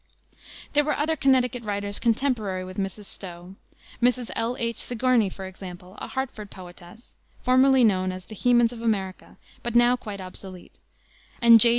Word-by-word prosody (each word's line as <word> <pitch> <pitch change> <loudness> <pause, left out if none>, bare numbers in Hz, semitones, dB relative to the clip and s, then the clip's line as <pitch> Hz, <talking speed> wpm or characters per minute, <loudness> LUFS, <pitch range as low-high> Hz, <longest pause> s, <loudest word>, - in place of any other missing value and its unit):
There 295 0 +4
were 300 0 0
other 315 +2 +1
Connecticut 255 -4 +2
writers 205 -1 -2
contemporary 225 -6 0
with 185 0 -9
Mrs. 195 +2 -4
Stowe: 180 -1 -8 0.5
Mrs. 245 0 +2
L. 230 +2 -1
H. 230 0 -2
Sigourney, 245 -3 +2
for 190 +1 -8
example, 185 -1 -10
a - - -5
Hartford 255 -6 -4
poetess, 180 +4 -13 0.3
formerly 260 0 +5
known 185 -4 +3
as 185 0 -8
"the - - -10
Hemans 240 +1 +3
of 230 - -9
America," 195 -5 -2 0.2
but 240 0 -4
now 240 +1 +6
quite 210 -5 -7
obsolete; 185 0 -10 0.6
and 235 -2 +8
J. 235 - +8
225 Hz, 160 wpm, -25 LUFS, 190-245 Hz, 0.6 s, and